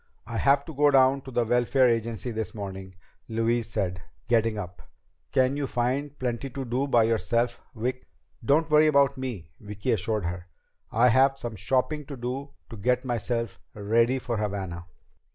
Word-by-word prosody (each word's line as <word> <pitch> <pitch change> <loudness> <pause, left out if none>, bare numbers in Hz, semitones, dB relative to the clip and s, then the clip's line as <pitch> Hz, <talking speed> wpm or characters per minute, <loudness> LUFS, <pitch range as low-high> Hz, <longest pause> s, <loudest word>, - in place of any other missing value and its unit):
"I 115 +1 -4
have 140 +2 +3
to 160 - -8
go 145 +1 +4
down 135 0 +4
to - - -7
the 120 -1 +1
Welfare 125 +2 +3
Agency 115 +1 -1
this 110 -1 -4
morning," 95 -2 -7 0.3
Louise 115 +1 0
said, 90 -4 -2 0.3
getting 115 -2 +2
up. 90 -3 -7 0.5
"Can 130 +1 +2
you 145 -1 -2
find 135 +4 -1
plenty 125 +1 -3
to 135 0 -5
do 125 +4 -1
by 120 -4 +4
yourself, 115 +1 0
Vic?" 125 +3 -3 0.4
"Don't 150 +7 +3
worry 155 +1 +6
about 140 -2 +4
me," 120 - -6
Vicki 105 +4 -3
assured 110 -2 0
her. 90 +1 -4 0.4
"I 120 +3 +4
have 135 +3 +4
some 120 -4 -6
shopping 135 +7 0
to 140 -3 -7
do 130 +4 -4 0.2
to 115 - -7
get 125 +5 +1
myself 115 -2 -2 0.2
ready 115 +5 +2
for 120 -3 -3
Havana." 95 -4 -4
120 Hz, 170 wpm, -27 LUFS, 110-135 Hz, 0.5 s, worry